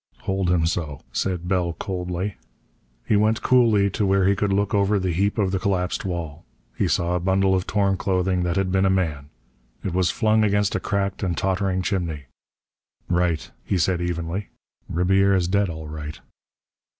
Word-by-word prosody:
"Hold 95 -1 -1
him 85 -2 +2
so," 80 -4 -2
said 90 -2 -2
Bell 90 -2 0
coldly. 90 +1 -4 0.7
He 110 - +2
went 110 +2 +2
coolly 110 -6 +4
to 105 - -1
where 95 -1 +3
he 100 +1 +4
could 100 0 0
look 100 +1 +1
over 100 0 +3
the 95 -2 -1
heap 100 +6 0
of 100 -3 +1
the 95 - 0
collapsed 95 -3 -1
wall. 85 -4 -4 0.3
He - - +1
saw 85 0 +1
a 90 - +1
bundle 95 +2 +2
of 95 0 0
torn 100 -2 +1
clothing 90 -1 0
that 90 -1 -1
had 95 -1 0
been 95 +1 +3
a - - +3
man. 80 -7 -1 0.5
It 95 - -3
was 90 -2 +2
flung 110 +1 +2
against 105 -1 +2
a - - 0
cracked 100 -1 -2
and 90 -3 -1
tottering 95 -1 0
chimney. 85 -7 -2 0.9
"Right," 90 -3 0
he 95 - -1
said 90 +1 +1
evenly. 85 +3 -3 0.4
"Ribiera's 95 +1 +2
dead, 100 +1 +1
all 80 -2 -6
right." 75 0 -7
95 Hz, 175 wpm, -23 LUFS, 85-100 Hz, 0.9 s, coolly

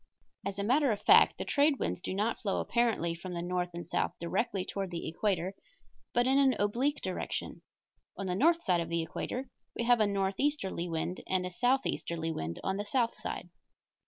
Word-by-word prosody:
As 200 0 -4
a 200 - -1
matter 265 +5 +3
of 205 - -1
fact, 440 +3 +7
the - - -4
trade 285 0 +3
winds - - -2
do 185 - -3
not 215 +4 0
flow 200 -3 0
apparently 230 -8 +1
from 175 +2 -7
the 170 - -2
north 180 0 -1
and 175 - -5
south - - -1
directly 185 +2 -1
toward 195 -2 -3
the 170 -1 -4
equator, 185 +1 -1 0.6
but 245 0 +2
in 265 +2 +4
an 270 -2 +4
oblique 245 +8 +1
direction. - - -4 0.6
On 195 - -3
the 180 - -1
north 330 - +3
side 175 -2 +2
of 165 - -4
the 170 -1 0
equator 255 +9 -4 0.2
we - - -1
have 240 0 +4
a 215 - +4
northeasterly 195 - -1
wind, 165 +2 -2
and 185 -1 +1
a 180 - -4
southeasterly 180 -8 0
wind 85 - -4
on 190 0 -1
the 205 - -2
south 235 +2 +1
side. - - -6
200 Hz, 195 wpm, -31 LUFS, 180-245 Hz, 0.6 s, fact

